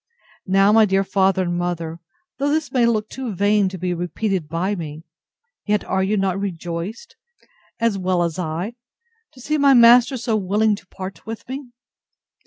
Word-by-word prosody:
Now, 195 +2 +4
my 220 0 +6
dear 195 -1 +2
father 190 -1 +2
and 175 -1 -2
mother, 170 -2 -3 0.4
though 285 +1 +1
this 305 0 -1
may 245 -3 +3
look 215 -2 0
too 250 -5 -6
vain 205 +1 +2
to 185 - -7
be 180 0 -2
repeated 175 0 -2
by 175 +5 -1
me; 160 -4 -6 0.6
yet 210 0 +1
are 190 - 0
you 200 +3 +1
not 195 -1 0
rejoiced, 180 - -5 0.6
as 230 -4 +1
well 185 -1 +1
as 170 +1 -3
I, 175 +6 -3 0.6
to 260 - -17
see 300 +4 -1
my 280 -1 +6
master 240 +2 +6
so 230 -2 -1
willing 210 +2 +1
to - - -16
part 190 +2 -9
with 225 0 -7
me? 265 0 -6
195 Hz, 175 wpm, -21 LUFS, 180-225 Hz, 0.6 s, my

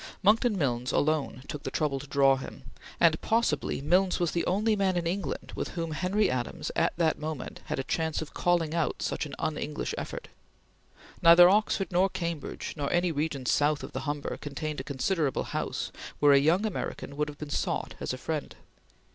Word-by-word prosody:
Monckton 215 +2 +4
Milnes 125 -5 0
alone 145 -4 0
took 150 - -5
the - - -4
trouble 145 -3 -1
to 140 - -9
draw 135 -1 +4
him, 135 - -8 0.4
and 165 -2 +4
possibly 220 - 0
Milnes 180 +5 +2
was 175 -2 +1
the 170 - 0
only 215 +4 +2
man 190 -3 +1
in 170 - -1
England 180 +3 -3
with - - -4
whom 165 -1 -2
Henry 185 +6 +1
Adams, 125 -1 -3
at - - +1
that 165 -2 +2
moment, 155 -3 -5
had - - -3
a 135 - -1
chance 160 +2 -1
of 155 - -6
calling 170 -3 +1
out 165 -2 -1
such - - -2
an - - -8
un 155 -1 -2
English 150 0 -3
effort. - - -6 0.9
Neither 170 +1 +9
Oxford 200 0 +2
nor 185 +2 +3
Cambridge 170 -4 -4
nor 145 -3 -2
any 175 0 +2
region 145 -3 -2
south 145 +3 +2
of - - -7
the - - -4
Humber 145 -1 -3
contained 150 +1 -5
a - - -4
considerable 145 +2 0
house - - -3 0.3
where 145 -1 +6
a 140 - +7
young 165 +9 +3
American 205 -8 -4
would 150 +1 -1
have 145 - -10
been 150 -1 -7
sought - - -1
as - - -3
a 130 - -4
friend. 150 +3 -4
155 Hz, 195 wpm, -28 LUFS, 145-175 Hz, 0.9 s, Neither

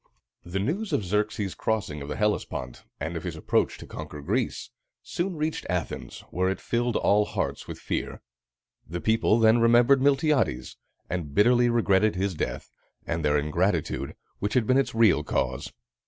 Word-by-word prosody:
The 90 +2 -4
news 165 - -2
of - - +1
Xerxes' 105 0 -1
crossing 100 -10 -2
of 70 - -6
the 75 - -3
Hellespont, 105 -12 -2
and - - -4
of - - -3
his - - -4
approach - - 0
to - - -10
conquer 75 -1 -8
Greece, 70 - -2 0.3
soon 180 +1 -3
reached 155 +1 -2
Athens, 90 -2 -4
where 95 +1 +1
it 95 - -2
filled 120 -1 -1
all 105 +1 +3
hearts - - -3
with - - -6
fear. - - -4 0.6
The 85 +2 -4
people 110 +2 +2
then 115 +1 +5
remembered 120 +3 +5
Miltiades, 140 - +1 0.3
and 80 -5 -4
bitterly 120 +3 +5
regretted 110 -3 +3
his 95 +1 -1
death, 80 - -4 0.3
and 80 -1 -2
their 75 0 +3
ingratitude, 80 +3 -1 0.2
which 105 +4 -2
had 125 -3 +3
been 130 +4 +4
its 135 - -1
real 110 -9 +4
cause. - - -2
105 Hz, 165 wpm, -26 LUFS, 85-120 Hz, 0.6 s, then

